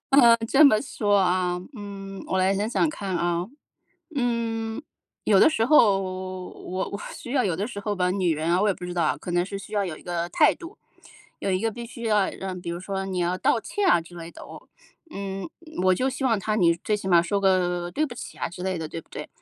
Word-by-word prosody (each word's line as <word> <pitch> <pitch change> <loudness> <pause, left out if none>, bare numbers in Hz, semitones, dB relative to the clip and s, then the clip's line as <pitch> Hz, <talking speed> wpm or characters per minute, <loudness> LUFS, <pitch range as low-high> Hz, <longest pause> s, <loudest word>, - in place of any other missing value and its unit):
嗯， 240 -4 +7
这 295 +3 +6
么 215 -6 +6
说 205 -6 +1
啊， 180 -1 +2
嗯， 195 -2 -8
我 190 - 0
来 190 +1 +3
想 205 +3 -1
想 280 - +2
看 195 - -3
啊。 175 +1 0 0.7
嗯， 230 -1 -1 0.4
有 200 - +5
的 - - +7
时 225 -7 +1
候 220 -8 +5
我 185 0 -5
我 200 - -6
需 245 - -8
要 260 -3 +2
有 180 -5 +1
的 200 +3 -1
时 240 -5 -7
候 205 0 -2
吧， 180 -2 +1
女 180 -4 +1
人 155 +2 -1
啊， 180 +2 +3
我 210 - +3
也 195 - +2
不 180 - -9
知 180 - -5
道 175 - +1
啊， 150 - +1
可 175 - -7
能 175 0 +2
是 195 +1 -5
需 205 +2 -11
要 200 -1 +2
有 165 -4 -4
一 - - -14
个 175 -1 -2
态 300 - +4
度， 345 +3 -11 0.6
有 - - -1
一 185 0 +1
个 225 0 0
必 235 +2 -7
须 235 0 -10
要 210 -3 +2
让 185 -2 -6
比 170 -1 -5
如 170 +1 -4
说 195 0 -3
你 185 -1 -3
要 175 +1 +1
道 230 - +2
歉 410 - -1
啊 170 - +5
之 170 +2 -13
类 165 0 -8
的 - - -13
哦。 - - -12 0.4
嗯， 195 +4 -5 0.4
我 185 - +5
就 255 +8 0
希 270 +1 -3
望 230 -4 +3
他 215 +2 -1
你 170 -4 +4
最 210 - +1
起 200 - -7
码 175 -2 +6
说 185 +4 0
个 180 -2 +1
对 305 +7 0
不 240 - -8
起 - - -9
啊 - - -2
之 180 +2 -9
类 185 -2 -1
的， 160 - -4
对 165 - -6
不 - - -29
对？ - - -7
195 Hz, 265 characters per minute, -25 LUFS, 180-225 Hz, 0.7 s, 嗯